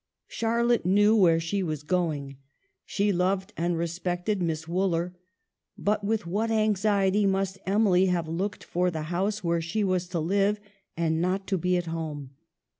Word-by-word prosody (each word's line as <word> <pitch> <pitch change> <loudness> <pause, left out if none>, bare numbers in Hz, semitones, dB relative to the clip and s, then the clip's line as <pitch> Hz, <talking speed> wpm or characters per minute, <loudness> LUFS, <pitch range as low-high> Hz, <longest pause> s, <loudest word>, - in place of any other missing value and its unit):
Charlotte 235 +1 +1
knew 205 +4 +4
where 170 -6 +5
she 165 +5 -2
was 155 -5 -3
going. 150 -5 -1 0.5
She 205 0 +1
loved 190 +3 0
and 170 0 -1
respected 175 +4 -2
Miss 160 -2 -2
Wooler; 175 0 0 0.6
but 210 0 0
with 215 -1 -1
what 205 +6 -1
anxiety 205 -2 +2
must 195 0 -1
Emily 190 -2 +3
have 175 -3 0
looked 185 +6 -3
for 180 +1 0
the 160 -3 -4
house 200 +4 -1
where 170 -1 +1
she 170 +6 -1
was 185 -2 0
to 175 -1 -3
live 200 +5 +1 0.4
and 160 -1 +1
not 185 +2 0
to 195 - 0
be 180 +2 +1
at 175 - -2
home. 155 -5 -5
185 Hz, 160 wpm, -27 LUFS, 170-200 Hz, 0.6 s, where